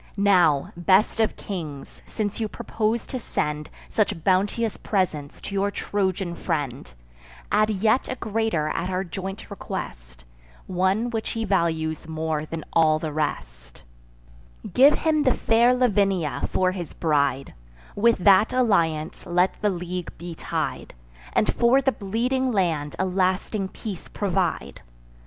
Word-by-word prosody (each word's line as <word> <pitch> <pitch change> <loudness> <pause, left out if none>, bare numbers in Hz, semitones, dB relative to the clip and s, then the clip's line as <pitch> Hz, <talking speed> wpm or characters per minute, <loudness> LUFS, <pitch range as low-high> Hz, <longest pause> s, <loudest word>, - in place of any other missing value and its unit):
Now, 180 -8 +3
best 190 +6 +3
of 220 - +2
kings, 155 -8 -7
since 210 -1 -3
you 220 - 0
propose 215 +2 -2
to 255 - -5
send 150 -8 -3 0.2
Such 190 -6 0
bounteous 200 +4 +1
presents 160 -8 -2
to - - -7
your 200 +1 +1
Trojan 190 -3 -2
friend; 145 - -3 0.6
Add 215 +1 +3
yet 215 +4 +1
a 255 - -2
greater 220 -9 -1
at 175 +3 -2
our 185 0 -1
joint 190 +2 -7
request, - - -7 0.4
One 190 +6 0
which 225 -2 -3
he 225 -1 -2
values 160 -5 0
more 160 -1 -2
than 165 -1 -5
all 155 -1 +4
the 155 0 -4
rest: - - -4 0.9
Give 275 +6 +7
him 315 -2 +1
the 260 -4 +3
fair 235 +2 +4
Lavinia 195 - +1
for 185 0 +2
his 180 -4 -6
bride; 140 -4 0 0.4
With 230 +3 +4
that 205 +1 +6
alliance 170 -12 +1
let 180 +1 +1
the 210 - +3
league 180 -1 -5
be 175 0 -7
tied, 160 - -4 0.4
And - - +2
for 240 +3 +4
the 270 0 +2
bleeding 250 +5 -1
land 165 -8 0
a 190 - 0
lasting 190 +2 0
peace 195 -1 -7
provide. 180 - -2
190 Hz, 140 wpm, -24 LUFS, 160-215 Hz, 0.9 s, Give